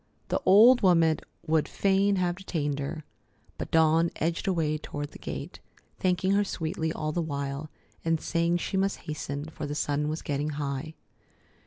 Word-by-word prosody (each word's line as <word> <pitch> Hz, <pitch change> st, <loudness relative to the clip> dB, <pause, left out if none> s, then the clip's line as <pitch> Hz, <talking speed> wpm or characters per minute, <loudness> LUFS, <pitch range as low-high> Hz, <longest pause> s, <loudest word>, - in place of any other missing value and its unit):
The -, -, 0 dB
old 230 Hz, +6 st, +8 dB
woman 165 Hz, -4 st, +4 dB, 0.3 s
would 160 Hz, -1 st, +2 dB
fain 195 Hz, +1 st, +2 dB
have 180 Hz, -2 st, 0 dB
detained 150 Hz, -7 st, -2 dB
her, 150 Hz, +3 st, -4 dB, 0.6 s
but -, -, -4 dB
Dawn 160 Hz, +1 st, +4 dB
edged 165 Hz, +5 st, -1 dB
away 160 Hz, -5 st, +1 dB
toward 145 Hz, -1 st, -6 dB
the -, -, -12 dB
gate, -, -, -6 dB, 0.4 s
thanking 185 Hz, +1 st, +1 dB
her 200 Hz, +1 st, +4 dB
sweetly 160 Hz, -4 st, -2 dB
all 155 Hz, -1 st, -2 dB
the 175 Hz, -, -1 dB
while, 140 Hz, -1 st, -4 dB, 0.3 s
and 165 Hz, -1 st, +1 dB
saying 170 Hz, +1 st, +1 dB
she 190 Hz, +2 st, -2 dB
must 195 Hz, +1 st, 0 dB
hasten, 145 Hz, -2 st, -5 dB
for 155 Hz, -1 st, -6 dB
the 145 Hz, -, -4 dB
sun 150 Hz, 0 st, 0 dB
was 155 Hz, +1 st, -4 dB
getting 145 Hz, +1 st, -1 dB
high. 145 Hz, +2 st, -3 dB
160 Hz, 165 wpm, -28 LUFS, 150-180 Hz, 0.6 s, old